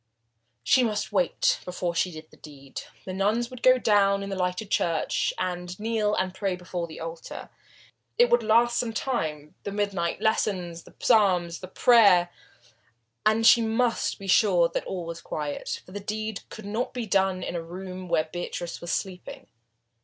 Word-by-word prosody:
She 260 Hz, -, +4 dB
must 215 Hz, -3 st, -1 dB
wait 185 Hz, -4 st, +2 dB
before 180 Hz, -1 st, -3 dB
she 170 Hz, +2 st, +1 dB
did 155 Hz, -1 st, -11 dB
the -, -, -18 dB
deed. 140 Hz, -3 st, -10 dB, 0.2 s
The 185 Hz, -, -5 dB
nuns 215 Hz, +6 st, 0 dB
would 255 Hz, -1 st, -10 dB
go 255 Hz, +1 st, +6 dB
down 200 Hz, -4 st, +3 dB
into 195 Hz, 0 st, -4 dB
the 190 Hz, -, -2 dB
lighted 180 Hz, +3 st, -2 dB
church, 165 Hz, -2 st, +1 dB
and 180 Hz, 0 st, -4 dB
kneel 215 Hz, -1 st, 0 dB
and 185 Hz, 0 st, -1 dB
pray 190 Hz, -1 st, -1 dB
before 180 Hz, -1 st, -5 dB
the 160 Hz, -, -10 dB
altar. 165 Hz, 0 st, -7 dB, 0.7 s
It 485 Hz, +1 st, +5 dB
would 240 Hz, -, +5 dB
last 235 Hz, +2 st, +3 dB
some 230 Hz, -2 st, -2 dB
time, 155 Hz, -, -3 dB
the 200 Hz, -, -5 dB
midnight 200 Hz, -4 st, -1 dB
lessons, 185 Hz, -6 st, -1 dB
the -, -, -17 dB
psalms, 185 Hz, -7 st, +3 dB
the 185 Hz, -, -8 dB
prayers 195 Hz, -4 st, +5 dB, 1.0 s
and 220 Hz, +1 st, +3 dB
she 235 Hz, -, +8 dB
must 230 Hz, +1 st, 0 dB
be 195 Hz, -, -10 dB
sure 180 Hz, -3 st, +4 dB
that -, -, -3 dB
all 180 Hz, -3 st, -4 dB
was 165 Hz, 0 st, -7 dB
quiet, 150 Hz, -2 st, -4 dB
for -, -, -15 dB
the 205 Hz, -, -5 dB
deed 215 Hz, +1 st, -5 dB
could 220 Hz, -, -10 dB
not 220 Hz, +5 st, -3 dB
be 245 Hz, -2 st, -2 dB
done 190 Hz, -2 st, +1 dB
in -, -, -4 dB
the 170 Hz, -, -2 dB
room 185 Hz, +2 st, -8 dB
where 165 Hz, -2 st, +3 dB
Beatrice 175 Hz, -1 st, -5 dB
was 170 Hz, -, -4 dB
sleeping. 185 Hz, -2 st, -4 dB
190 Hz, 175 wpm, -26 LUFS, 175-220 Hz, 1.0 s, she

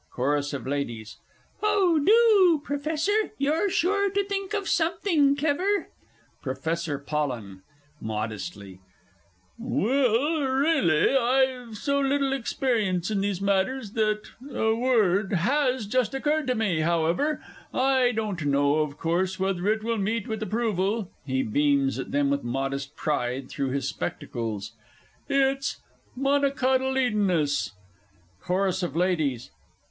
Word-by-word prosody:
CHORUS 145 Hz, +3 st, 0 dB
OF 140 Hz, -, -5 dB
LADIES. 120 Hz, -6 st, -4 dB, 0.4 s
Oh, 390 Hz, -7 st, +3 dB
do, 410 Hz, -5 st, +5 dB
Professor 320 Hz, +9 st, -1 dB
you're 310 Hz, +8 st, +1 dB
sure 400 Hz, +3 st, +1 dB
to 400 Hz, +1 st, 0 dB
think 395 Hz, +1 st, -3 dB
of 400 Hz, -2 st, -2 dB
something 320 Hz, -4 st, +2 dB
clever! 335 Hz, +8 st, 0 dB, 0.5 s
PROFESSOR 155 Hz, +3 st, -2 dB
POLLEN 130 Hz, -10 st, -4 dB, 0.4 s
(modestly). 105 Hz, -, -5 dB, 0.8 s
Well, 255 Hz, +5 st, +1 dB
really, 265 Hz, -, +2 dB
I've 255 Hz, -2 st, +1 dB
so 280 Hz, +5 st, 0 dB
little 275 Hz, 0 st, +1 dB
experience 220 Hz, -8 st, -1 dB
in 200 Hz, -2 st, 0 dB
these 200 Hz, -2 st, -1 dB
matters 200 Hz, +4 st, 0 dB
that 215 Hz, -1 st, 0 dB, 0.3 s
A 220 Hz, -5 st, +1 dB
Word 215 Hz, -5 st, +2 dB
has 255 Hz, -, +1 dB
just 250 Hz, +2 st, 0 dB
occurred 295 Hz, +1 st, 0 dB
to 255 Hz, -, +1 dB
me, 205 Hz, -8 st, 0 dB
however; 170 Hz, -, +1 dB, 0.3 s
I 260 Hz, -1 st, +3 dB
don't 215 Hz, -7 st, -3 dB
know, 140 Hz, +1 st, +2 dB
of 150 Hz, -2 st, -2 dB
course, 185 Hz, +3 st, -1 dB
whether 190 Hz, -1 st, -1 dB
it 215 Hz, +1 st, +1 dB
will 230 Hz, -1 st, -1 dB
meet 215 Hz, +2 st, -1 dB
with 220 Hz, -1 st, -4 dB
approval 215 Hz, -2 st, -1 dB, 0.2 s
(he 130 Hz, 0 st, 0 dB
beams 140 Hz, +3 st, +1 dB
at -, -, -5 dB
them 140 Hz, -1 st, +1 dB
with 140 Hz, 0 st, -1 dB
modest 135 Hz, +3 st, -3 dB
pride 130 Hz, -3 st, -2 dB
through 135 Hz, -1 st, -2 dB
his 135 Hz, 0 st, -2 dB
spectacles) 110 Hz, -7 st, -4 dB, 0.6 s
it's 275 Hz, 0 st, +1 dB, 0.4 s
"Monocotyledonous." 260 Hz, -, +1 dB, 0.7 s
CHORUS 185 Hz, 0 st, 0 dB
OF 175 Hz, -5 st, -3 dB
LADIES. 155 Hz, -8 st, 0 dB
215 Hz, 120 wpm, -26 LUFS, -, 0.8 s, do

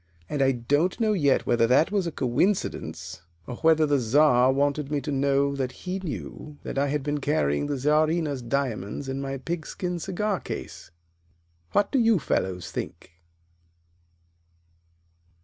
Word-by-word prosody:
And 145 Hz, -, -2 dB
I 135 Hz, 0 st, +4 dB
don't 145 Hz, -, 0 dB
know 220 Hz, -2 st, +2 dB
yet 145 Hz, -8 st, +2 dB
whether 115 Hz, -1 st, +3 dB
that 140 Hz, +9 st, +4 dB
was 200 Hz, -4 st, 0 dB
a -, -, -2 dB
coincidence, 125 Hz, -, -1 dB, 0.2 s
or 125 Hz, -, -7 dB
whether 160 Hz, -1 st, +4 dB
the 145 Hz, -2 st, +2 dB
Czar 125 Hz, +1 st, +4 dB
wanted 140 Hz, +1 st, 0 dB
me 145 Hz, -1 st, 0 dB
to 145 Hz, +2 st, -5 dB
know 140 Hz, 0 st, +1 dB
that 130 Hz, +1 st, -5 dB
he 185 Hz, +1 st, -2 dB
knew 150 Hz, -3 st, -7 dB
that -, -, -3 dB
I 140 Hz, -, +2 dB
had 145 Hz, 0 st, -1 dB
been 145 Hz, +1 st, -1 dB
carrying 140 Hz, -, 0 dB
the 145 Hz, -1 st, -2 dB
Czarina's 150 Hz, 0 st, +1 dB
diamonds 120 Hz, -2 st, -2 dB
in 135 Hz, +1 st, -3 dB
my 135 Hz, 0 st, -3 dB
pigskin 170 Hz, +4 st, -4 dB
cigar 195 Hz, +2 st, -1 dB
case. -, -, -7 dB, 0.8 s
What 205 Hz, -, +2 dB
do 275 Hz, -, +2 dB
you 225 Hz, -3 st, +4 dB
fellows 95 Hz, -, -2 dB
think?" -, -, -6 dB
145 Hz, 150 wpm, -26 LUFS, 130-165 Hz, 0.8 s, I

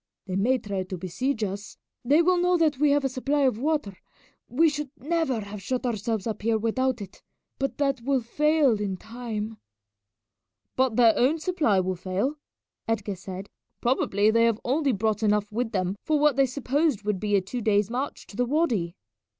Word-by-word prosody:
They 185 Hz, -2 st, -4 dB
may 240 Hz, +7 st, +2 dB
try 200 Hz, -5 st, -4 dB
to 185 Hz, 0 st, -5 dB
besiege 220 Hz, +8 st, -2 dB
us. 200 Hz, +1 st, -5 dB, 0.3 s
They 290 Hz, +7 st, +4 dB
will 360 Hz, +1 st, +3 dB
know 360 Hz, 0 st, +3 dB
that 310 Hz, -5 st, +2 dB
we 300 Hz, 0 st, +4 dB
have 285 Hz, -1 st, +2 dB
a -, -, +4 dB
supply 275 Hz, +3 st, -1 dB
of 255 Hz, -5 st, +2 dB
water 290 Hz, -, -1 dB, 0.5 s
we 315 Hz, +7 st, +4 dB
should 295 Hz, -2 st, -2 dB
never 290 Hz, -4 st, -1 dB
have 200 Hz, 0 st, -8 dB
shut 255 Hz, +6 st, -2 dB
ourselves 220 Hz, -2 st, -2 dB
up 220 Hz, -2 st, -3 dB
here 225 Hz, +1 st, +2 dB
without 235 Hz, +1 st, 0 dB
it 190 Hz, -, -13 dB, 0.4 s
but 275 Hz, 0 st, -2 dB
that 275 Hz, -3 st, 0 dB
will 265 Hz, +1 st, +1 dB
fail 290 Hz, -2 st, +2 dB
in 195 Hz, -2 st, -2 dB
time." 220 Hz, -1 st, -5 dB, 1.2 s
"But 260 Hz, -3 st, +2 dB
their 230 Hz, -2 st, +6 dB
own 270 Hz, +6 st, +3 dB
supply 310 Hz, -, +1 dB
will 185 Hz, 0 st, -2 dB
fail," 195 Hz, -, -2 dB, 0.5 s
Edgar 215 Hz, -3 st, -1 dB
said. 190 Hz, +1 st, -8 dB, 0.3 s
"Probably 215 Hz, -4 st, +2 dB
they 230 Hz, +1 st, +4 dB
have 230 Hz, -2 st, +1 dB
only 280 Hz, +2 st, +2 dB
brought 215 Hz, 0 st, 0 dB
enough 210 Hz, -1 st, +1 dB
with 225 Hz, +1 st, -2 dB
them 185 Hz, -1 st, -1 dB
for 310 Hz, -, +1 dB
what 300 Hz, -2 st, +4 dB
they 275 Hz, 0 st, +4 dB
supposed 280 Hz, -1 st, 0 dB
would 210 Hz, -2 st, -1 dB
be 205 Hz, 0 st, +1 dB
a 195 Hz, -, +3 dB
two 235 Hz, +6 st, -5 dB
days' 210 Hz, -1 st, +2 dB
march 260 Hz, +4 st, -3 dB
to -, -, -14 dB
the 245 Hz, +3 st, +1 dB
wady." 235 Hz, -, 0 dB
235 Hz, 190 wpm, -26 LUFS, 205-280 Hz, 1.2 s, their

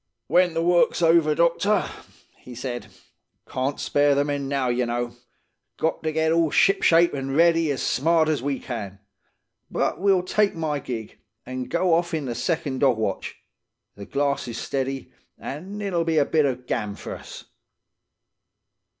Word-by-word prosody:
"'When 180 Hz, -2 st, +3 dB
the 165 Hz, -, +1 dB
work's 175 Hz, 0 st, +3 dB
over, 165 Hz, -2 st, +4 dB
doctor,' 175 Hz, +5 st, +2 dB, 0.5 s
he 125 Hz, -, -12 dB
said. 120 Hz, -3 st, -5 dB, 0.6 s
'Can't 130 Hz, +2 st, -2 dB
spare 145 Hz, 0 st, +2 dB
the 140 Hz, +1 st, +2 dB
men 145 Hz, -1 st, -2 dB
now, 135 Hz, -2 st, 0 dB
ye 120 Hz, +1 st, +1 dB
know. 120 Hz, 0 st, -3 dB, 0.6 s
Got 160 Hz, -, -1 dB
to 155 Hz, -, -1 dB
get 160 Hz, +1 st, +1 dB
all 165 Hz, -1 st, +3 dB
shipshape 170 Hz, -1 st, +4 dB
an' 135 Hz, -1 st, -3 dB
ready 165 Hz, 0 st, +4 dB
as 140 Hz, -3 st, -2 dB
smart 160 Hz, +3 st, +2 dB
as 155 Hz, -5 st, 0 dB
we 140 Hz, 0 st, -1 dB
can. 105 Hz, -6 st, -6 dB, 0.7 s
But, -, -, -1 dB
we'll 190 Hz, -1 st, +3 dB
take 205 Hz, +2 st, +1 dB
my 155 Hz, -3 st, -2 dB
gig, 115 Hz, -5 st, -7 dB, 0.3 s
an' 130 Hz, 0 st, -4 dB
go 170 Hz, +3 st, +1 dB
off 170 Hz, 0 st, +1 dB
in 155 Hz, -3 st, -3 dB
the 120 Hz, -, -3 dB
second 140 Hz, -2 st, -2 dB
dog 130 Hz, -4 st, +3 dB
watch. 110 Hz, -3 st, -3 dB, 0.6 s
The 100 Hz, -1 st, -10 dB
glass 140 Hz, -1 st, -1 dB
is 120 Hz, -1 st, -5 dB
steady, 135 Hz, -1 st, -3 dB, 0.3 s
an' 185 Hz, +9 st, -7 dB
it'll 190 Hz, -5 st, -1 dB
be 165 Hz, -1 st, 0 dB
a 145 Hz, -, +4 dB
bit 155 Hz, -1 st, +2 dB
of 125 Hz, -1 st, -4 dB
gam 105 Hz, -4 st, -2 dB
for -, -, -7 dB
us. -, -, -11 dB
145 Hz, 165 wpm, -24 LUFS, 130-165 Hz, 0.7 s, over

